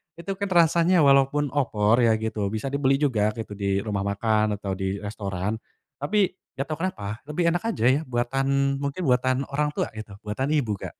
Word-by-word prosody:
itu 170 +3 -6
kan 200 - 0
rasanya 170 0 +4
walaupun 140 +1 +4
opor 115 -6 +2
ya 115 - +4
gitu 110 -2 -2
bisa 110 +5 -2
dibeli 135 -1 +2
juga 110 -7 +2
gitu 110 -2 -6
di 100 -1 0
rumah 100 -2 -2
makan 105 +1 +1
atau 100 - -3
di 95 0 -2
restoran, 100 0 -3 0.4
tapi 190 +7 +1 0.2
gak 135 +3 -4
tau 155 - -2
kenapa 110 - -3
lebih 170 +3 +1
enak 175 +1 -1
aja 225 - -1
ya 135 +3 +3
buatan 135 +3 0
mungkin 140 +5 -3
buatan 130 +1 +2
orang 150 +1 -1
tua - - -1
gitu 110 -2 -8
buatan 130 +8 -2
ibu 115 -9 0
Kak. - - -7
130 Hz, 185 wpm, -25 LUFS, 105-145 Hz, 0.4 s, rasanya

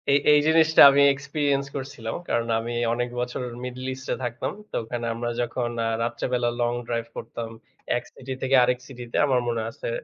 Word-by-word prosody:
এ - - +5 0.2
এই 150 - +7
জিনিসটা 160 0 +5
আমি 140 +1 +4
experience 140 0 -1
করছিলাম। 130 -5 -5
কারণ 115 0 0
আমি 115 +1 -4 0.2
অনেক 120 +1 -1
বছর 125 +1 -3 0.2
middle 125 +1 -6
east 130 0 -10
এ - - -1
থাকতাম। 120 0 -3 0.2
তো - - -6
ওখানে 120 +1 -4
আমরা 120 +1 -3
যখন 120 0 -2 0.2
আ - - +1 0.2
রাত্রে 115 0 -3
বেলা 120 -1 +2
long 120 0 +1
drive 115 -1 -2
করতাম 115 0 -6 0.5
এক - - -5
সিটি 130 0 -6
থেকে 135 +1 +2
আরেক 125 0 +1
সিটিতে 120 -3 -6
আমার 130 -3 +2
মনে 115 -1 -1
আছে। - - -6
125 Hz, 190 wpm, -25 LUFS, 120-135 Hz, 0.5 s, এই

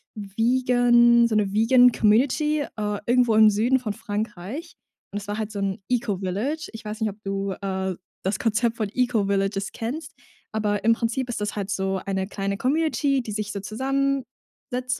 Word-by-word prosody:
vegan 240 +2 +4
so 225 - -1
'ne 205 -2 +1
vegan 245 +3 +6
Community, 265 +8 +2
äh, 210 -6 -3
irgendwo 245 -2 +3
im 220 0 +7
Süden 230 +6 +2
von 220 -5 -3
Frankreich. 215 - -5 0.4
Und 205 - -4
das 200 - -11
war 205 +1 -3
halt 215 -1 -3
so 205 - -5
'n 195 +1 -2
Eco-Village. 225 - -1
Ich 220 -1 -10
weiß 215 +1 -6
nicht, 220 - +1
ob 205 - -10
du, 195 0 -2
äh, 190 -1 -2 0.3
das 190 +1 -1
Konzept 230 +1 +1
von 215 -3 -1
Eco-Villages 200 -5 0
kennst, 260 +8 -5 0.4
aber 210 -1 -1
im 230 +1 +5
Prinzip 235 +2 -2
ist 240 - -3
das 210 - -2
halt 200 -2 -3
so 190 -1 -1
eine 190 -1 -2
kleine 200 -1 -3
Community, 285 +1 +1
die 225 - -7
sich 210 0 -3
so 200 - -4
zusammensetzt 255 +1 -3
220 Hz, 170 wpm, -24 LUFS, 200-250 Hz, 0.4 s, im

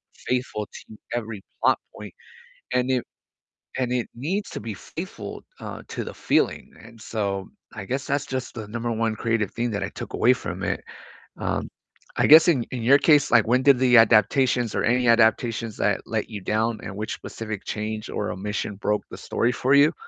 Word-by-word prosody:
faithful 125 -5 -2
to 110 - -13 0.2
every 110 -4 -4 0.2
plot - - +4 0.2
point, - - -9 0.6
and 125 0 +1
it 125 -2 +1 0.7
and 125 -1 -1
it 125 -2 -1
needs 180 - -3
to - - -6
be 110 0 -5
faithful, - - -8 0.2
uh, - - -7
to - - -4
the - - -7
feeling, - - 0
and, 115 0 -15
so, 100 -3 -3 0.3
I 100 - -6
guess 135 +2 -3
that's 140 -1 0
just 130 -2 -4
the 110 -3 -7
number 115 +1 -3
1 115 -1 -1
creative 115 -3 0
thing 120 -1 -2
that 100 -1 -2
I 95 - -1
took - - -8
away 125 - +5
from 95 -6 -4
it. 100 - -1 0.6
Um, - - -2 0.5
I - - +3
guess 160 +3 +9
in 130 -8 +3
in 120 -3 -4
your 140 +4 +7
case, 150 -3 +4
like, 115 -3 +5
when 125 +2 +3
did 140 -3 +6
the 125 -1 +4
adaptations, 115 +2 +4
or - - 0
any 125 +1 +2
adaptations 115 -1 +2
that - - +1
let - - -2
you 105 -2 -6
down, 110 +3 0
and 95 - -6
which 110 0 -3
specific 110 -3 -6
change 110 +1 -4
or 105 - -2
omission 105 +1 -4
broke 105 +1 -1
the - - -8
story 120 - 0
for 130 +3 +1
you? 145 +2 +6
115 Hz, 190 wpm, -24 LUFS, 105-125 Hz, 0.7 s, guess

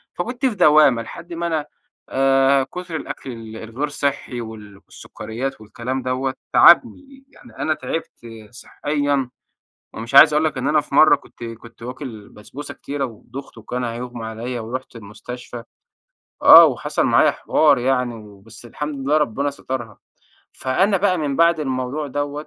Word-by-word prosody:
فكنت 245 +9 -3
في 250 -5 +1
دوّامة 150 - +5
لحد 170 +9 -10
ما 170 0 -3
أنا 160 -3 -1 0.4
آآ 135 0 +3
كتر 175 +4 -7
الأكل 140 -3 -6
ال 110 -2 -9
الغير 115 +7 -4
صحّي، 140 -4 -3
وال 110 -3 -10
والسُكريّات، 110 +3 -7
والكلام 120 +5 -5
دوّة، 130 +1 -2 0.2
تعبني. 270 +10 +4
يعني 245 - -18
أنا 155 - +1
تعبت 165 +1 -6 0.3
صحّيًا، 145 +1 -2 0.6
ومش 115 +4 -6
عايز 150 +2 +9
أقول 155 +1 +2
لك 150 -3 -2
إن 130 +1 -2
أنا 150 0 +3
في 140 - -7
مرّة 155 0 +7
كنت 140 - -14
كنت 115 0 -10
واكل 125 -4 -8
بسبوسة 130 +7 -10
كتيرة 140 -1 -4
ودُخت، 130 +3 -11
وكان 125 +3 -5
هيُغمى 120 0 -5
علىّا، 115 +3 -5
ورُحت 125 +3 -6
المستشفى 115 +3 -9 0.8
آه. - - +10
وحصل - - 0
معايا - - +4
حوار 150 -3 +2
يعني 125 -1 0
وبس 105 +1 -14
الحمد 150 +4 -6
لله 150 +2 +3
ربنا 145 -1 0
سترها. 125 -6 -6 0.5
فأنا 190 +10 +1
بقى 185 -1 +1
من 145 -3 -2
بعد 170 -1 +3
الموضوع 130 +1 -3
دوّة 145 +2 -4
135 Hz, 150 wpm, -21 LUFS, 115-150 Hz, 0.8 s, آه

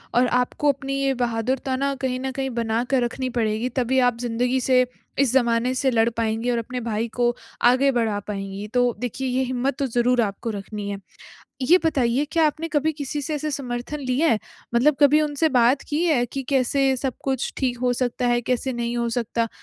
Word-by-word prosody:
और 250 +1 +4
आपको 250 +4 +1
अपनी 275 0 -4
ये 270 0 +2
बहादुरता 250 +3 -1
ना 275 +1 0
कहीं 255 -1 -1
न 265 +1 -3
कहीं 265 0 -3
बना 230 0 0
कर 265 -3 +2
रखनी 255 +2 -2
पड़ेगी, 220 +2 0
तभी 255 +1 +1
आप 245 -2 +2
ज़िंदगी 245 +2 0
से, 255 0 +4 0.3
इस 275 -4 +3
ज़माने 240 -1 +2
से 265 +1 +1
लड़ 230 -1 +3
पाएँगी 225 +1 0
और 240 - 0
अपने 250 +2 -4
भाई 225 0 -1
को 240 0 +2 0.3
आगे 260 +3 +5
बढ़ा 225 -5 0
पाएँगी 195 0 -5
तो 245 -1 +3
देखिए 250 +2 -3
ये 255 +1 +1
हिम्मत 255 +1 -1
तो 280 - +1
ज़रूर 245 0 +2
आपको 205 +1 -3
रखनी 205 0 -6
है। 200 - -3 0.7
ये 335 +8 +6
बताइए 270 -4 +2
क्या 330 -2 +4
आपने 310 +2 -2
कभी 315 -1 +1
किसी 290 -1 -4
से 305 +3 -3
ऐसे 305 +1 -2
समर्थन 265 +1 -4
लिया 270 +4 +1
है? 225 - +3 0.4
मतलब 270 +5 +4
कभी 295 +1 +6
उनसे 300 +1 +1
बात 250 0 +3
की 300 +3 0
है 300 -8 +3
कि, 270 +3 -5
कैसे 270 0 +1
सब 260 0 -2
कुछ 265 -2 -1
ठीक 250 -3 -1
हो 250 0 +1
सकता 245 0 -1
है, 240 0 +2
कैसे 250 +2 -1
नहीं 240 0 -2
हो 235 0 0
सकता, 230 0 -1
250 Hz, 205 wpm, -23 LUFS, 235-275 Hz, 0.7 s, ये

